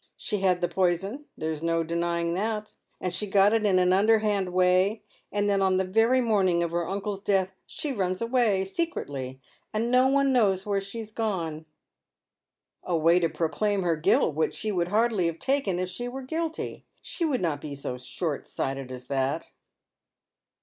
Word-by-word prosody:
She 210 -3 -2
had 185 -2 +2
the 175 - +2
poison 190 - -1
— - - -52
there's 155 -1 -3
no 165 0 +1
denying 170 +1 -1
that 210 +3 -2
— - - -44
and 180 -1 -3
she 210 +4 -1
got 200 +2 +4
it 220 -2 +2
in 190 -2 +3
an 180 0 +4
underhand 205 -2 +2
way, 185 +4 +3 0.3
and 205 0 0
then 200 -1 +2
on 190 -1 +3
the 190 - +2
very 225 +7 +3
morning 190 -7 +2
of 170 - -2
her 170 -1 -1
uncle's 200 0 -3
death 190 -2 +1
she 295 - -3
runs 185 -6 -1
away, 230 -5 +2
secretly 145 - -3 0.2
— - - -42
and 230 +3 0
no 255 +1 +5
one 275 0 +3
knows 195 -6 +2
where 200 -1 0
she's 215 +2 -7
gone." 170 -9 -3 0.6
" - - -64 0.3
A 175 -2 0
way 165 +3 +4
to 165 -2 +1
proclaim 175 +6 0
her 170 -2 +2
guilt, 155 0 +2
which 155 +2 0
she 215 - -2
would 175 -3 0
hardly 210 -2 +2
have 165 -1 -3
taken 265 -8 0
if 180 0 -2
she 240 +7 -5
were 265 +2 -6
guilty. 320 +4 -4 0.2
She 345 - -4
would 290 -6 +1
not 155 -5 -1
be 145 -2 -6
so 125 -2 -5
short 150 +3 -4
sighted 135 -1 -4
as 125 -1 -8
that." 135 +4 -1
190 Hz, 190 wpm, -27 LUFS, 170-220 Hz, 0.6 s, no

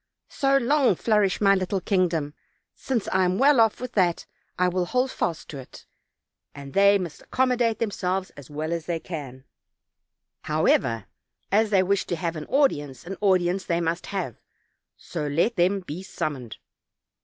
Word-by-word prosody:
So 275 0 +2
long 270 -3 +3
flourish 210 -1 +1
my 195 -1 +5
little 190 0 0
kindgom; 170 -6 0 0.4
since 245 -6 -2
I 190 - +2
am 180 +1 +1
well 275 0 +5
off 225 -2 +3
with 250 0 -5
that 180 -6 +1 0.3
I 180 - +3
will 180 0 0
hold 255 +7 0
fast 165 -2 -3
to 140 - -7
it; 130 - -13 0.7
and 140 -1 -9
they 200 0 +5
must 175 -5 -6
accommodate 250 -3 +1
them 230 -3 -1
selves 185 -1 -2
as 140 -3 -13
well 155 +3 -3
as 165 -2 -4
they 170 -2 -1
can; 140 -7 -7 1.0
however, 130 -8 +1 0.5
as 215 +2 +3
they 195 -3 +4
wish 195 +1 0
to 175 - -1
have 165 0 -3
an 155 -1 -6
audience, 145 - 0
an 195 +2 -5
audience 185 -1 +2
they 170 -1 0
must 170 +1 -2
have, 185 - -4 0.6
so 155 -4 -5
let 165 +11 +1
them 190 +2 +2
be 180 0 -7
summoned." 145 - -5
185 Hz, 165 wpm, -25 LUFS, 160-205 Hz, 1.0 s, my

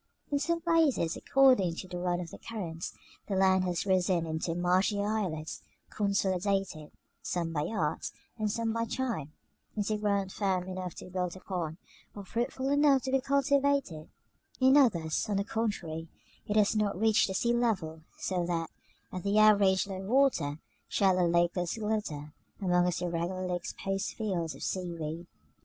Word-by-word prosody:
In 285 - +2
some 335 +2 0
places, 320 - +2
according 255 -11 +4
to 185 - -7
the 180 -1 -5
run 175 0 0
of 170 -2 -6
the - - -10
currents, 175 -8 -6 0.3
the 200 - -1
land 190 -1 +4
has 180 0 -1
risen 185 -3 +2
into 160 +1 -2
marshy 185 +4 +2
islets, 200 -7 -2 0.3
consolidated, 195 -5 0 0.3
some 170 -2 -2
by 150 0 -1
art, 220 - -1 0.3
and 215 -1 0
some 225 +1 -1
by 230 0 0
time, 225 - -3 0.5
into 210 +1 0
ground 200 -2 0
firm 185 -3 -1
enough 185 -1 -5
to - - -9
be 185 - -12
built 180 -1 -2
upon, 175 -4 -4 0.4
or 200 -1 -8
fruitful 250 +5 -2
enough 285 -2 +4
to 265 - -2
be 270 0 +3
cultivated: 280 - +1 0.5
in 260 +1 +6
others, 190 - +3
on 205 - +1
the 200 - +1
contrary, 195 -8 -3 0.4
it 210 - -1
has 210 0 +4
not 205 -3 0
reached 220 -1 +4
the 190 - -4
sea 235 +4 +2
level; 195 -10 0 0.2
so 180 -2 -1
that, 165 -2 -2 0.4
at 185 - -4
the 200 +2 +1
average 205 -3 +5
low 195 -1 -5
water, 215 - +2 0.3
shallow 185 -3 +3
lakelets 175 +2 +1
glitter 205 -9 -3 0.3
among 180 -2 +2
its 180 0 -1
irregularly 180 +1 -2
exposed 195 +2 -3
fields 180 -7 -2
of - - -9
seaweed. 170 -2 -4
190 Hz, 160 wpm, -30 LUFS, 175-220 Hz, 0.5 s, in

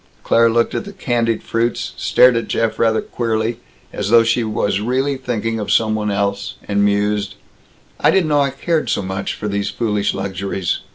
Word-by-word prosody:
Claire 115 0 +4
looked 115 +1 +1
at - - -2
the 200 -1 -10
candied 120 - -1
fruits, 115 +1 -1
stared 125 -1 +4
at 115 - -1
Jeff 115 -1 -1
rather 110 -1 +2
queerly 115 0 -2 0.3
as 100 -1 -3
though 115 0 +6
she 115 +1 +1
was 105 -2 -1
really 130 +5 0
thinking 115 -3 -3
of 105 - -3
some 110 -1 +3
one 105 -1 -1
else 100 0 -2
and 100 0 +1
mused: 105 0 0 0.6
"I - - +4
didn't 185 -5 +2
know 145 -1 +3
I 140 - +2
cared 155 +4 -1
so - - 0
much 95 +1 -3
for 105 - -5
these 100 0 -1
foolish 105 -3 -1
luxuries. 95 -1 -2
110 Hz, 185 wpm, -19 LUFS, 100-120 Hz, 0.6 s, though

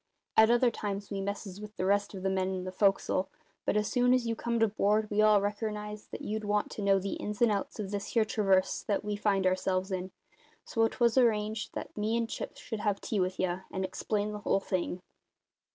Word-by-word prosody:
At 220 0 +7
other 240 +1 +4
times 200 -2 -4
we 195 -1 -2
messes 200 0 -5
with 210 0 -9
the 185 - -2
rest 200 +1 +1
of 190 - -7
the 190 - +1
men 190 0 0
in 185 - -4
the 185 - -5
fo'c'sle; 195 -1 +2 0.4
but - - +2
as 210 0 +1
soon 245 0 +3
as 250 -2 0
you 230 0 -1
comed 235 0 0
aboard 215 0 +2
we 210 +1 +3
all 215 -1 +6
reckernised 210 +1 -4
that - - -7
you'd 215 +1 -3
want 210 0 0
to - - -5
know 200 -1 +4
the 195 +1 -2
ins 210 0 -5
and 235 -2 +4
outs 200 +2 -2
of 200 -2 -4
this 200 -1 -3
here 225 -2 +4
traverse 195 -3 +2
that 205 0 -1
we 210 0 -1
finds 200 -2 +1
ourselves 185 +1 +1
in, 185 0 -2 0.6
so 225 -1 +2
'twas 235 +1 +2
arranged 215 -2 +1
that - - -6
me 220 +2 0
and 230 -1 -2
Chips - - -5
should 220 - -5
have 205 -2 0
tea 215 - -2
with 185 0 -1
ye, 180 -1 0
and 190 0 -2
explain 205 +2 -2
the 210 - -5
whole 200 - +1
thing." 185 -1 -2
205 Hz, 225 wpm, -30 LUFS, 195-215 Hz, 0.6 s, At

